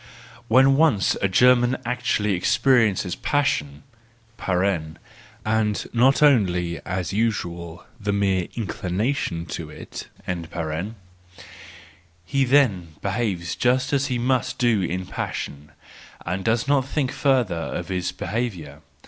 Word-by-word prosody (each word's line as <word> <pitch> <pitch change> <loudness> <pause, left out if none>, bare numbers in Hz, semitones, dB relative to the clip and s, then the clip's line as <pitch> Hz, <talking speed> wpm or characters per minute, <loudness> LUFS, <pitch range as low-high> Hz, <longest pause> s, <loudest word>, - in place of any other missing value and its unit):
—When 135 +4 +5
once 145 - +3
a 100 - +3
German 125 +5 +4
actually 115 -4 0
experiences 115 -2 +2
passion 75 - -1 1.6
(and 110 -1 0
not 130 +5 +4
only, 90 - +2
as 90 -2 -2
is - - -5
usual, 85 -6 -2
the 105 -1 -1
mere 95 -3 +1
inclination 105 -3 -2
to 75 - -6
it), - - -9 2.2
he 135 +8 +1
then 105 - +2
behaves 100 -5 -2
just 125 +3 +1
as 140 0 +2
he 125 - -1
must 125 +1 0
do 120 -5 +2
in 90 +1 -2
passion, 75 -4 -5 0.5
and 90 +2 -2
does 115 +3 +1
not 140 -2 +2
think 135 -2 -1
further 130 -8 +2
of 85 - -4
his 90 -1 -1
behaviour. 90 -9 -4
110 Hz, 115 wpm, -23 LUFS, 90-125 Hz, 2.2 s, When